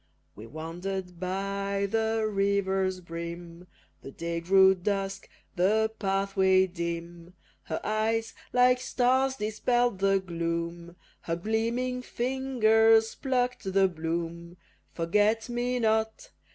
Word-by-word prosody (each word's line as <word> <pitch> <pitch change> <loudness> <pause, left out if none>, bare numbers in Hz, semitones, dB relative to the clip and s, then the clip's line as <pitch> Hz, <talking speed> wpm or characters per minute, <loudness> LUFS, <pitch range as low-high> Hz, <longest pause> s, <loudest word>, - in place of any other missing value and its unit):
We 110 +2 -10
wander'd 175 +4 -6
by 195 +2 -2
the 220 +1 0
river's 195 -2 0
brim, 170 +1 -8 0.3
The - - -9
day 170 +4 -4
grew 190 +2 +6
dusk, 195 +1 -3 0.3
the 215 +5 +2
pathway 195 -1 +2
dim; 170 0 -6 0.3
Her 160 - -3
eyes 225 +1 0 0.2
like 250 0 +4
stars 260 +2 +1
dispell'd 240 0 0
the 195 0 +3
gloom, 170 -1 -4 0.3
Her 165 - -2
gleaming 230 +6 -1
fingers 225 -4 +2
pluck'd 250 -2 -1
the 195 0 +5
bloom. 170 0 -4 0.3
Forget 210 +7 +1
me 245 +1 -1
not! 220 - 0
195 Hz, 105 wpm, -28 LUFS, 175-225 Hz, 0.3 s, grew